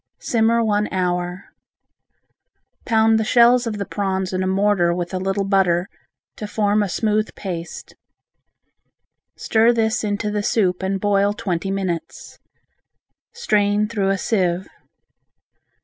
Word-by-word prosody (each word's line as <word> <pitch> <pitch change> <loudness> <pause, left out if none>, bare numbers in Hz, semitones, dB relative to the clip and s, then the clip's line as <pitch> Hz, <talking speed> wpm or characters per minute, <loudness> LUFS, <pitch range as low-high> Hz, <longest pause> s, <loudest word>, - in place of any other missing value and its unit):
Simmer 230 0 +1
one 210 -1 0
hour. 180 0 -2 1.4
Pound 225 -1 +3
the - - +1
shells 240 +2 +4
of 215 -2 -3
the 200 - -3
prawns 190 -1 -2
in 185 - -1
a 185 - -1
mortar 190 -3 +2
with 175 0 -4
a 185 - -1
little 195 +1 -1
butter, 190 -2 +1 0.5
to 210 - -5
form 205 0 +1
a 205 - -1
smooth 215 +2 0
paste. 175 -4 -7 1.4
Stir 225 +1 +3
this 225 -2 0
into 210 0 -2
the 210 0 -1
soup 190 -4 0
and 190 +1 -2
boil 200 0 +1
twenty 195 -4 -3
minutes. 190 -4 -5 0.9
Strain 210 - +1
through 205 -4 -1
a 195 - +1
sieve. 185 -3 -1
200 Hz, 130 wpm, -21 LUFS, 185-215 Hz, 1.4 s, shells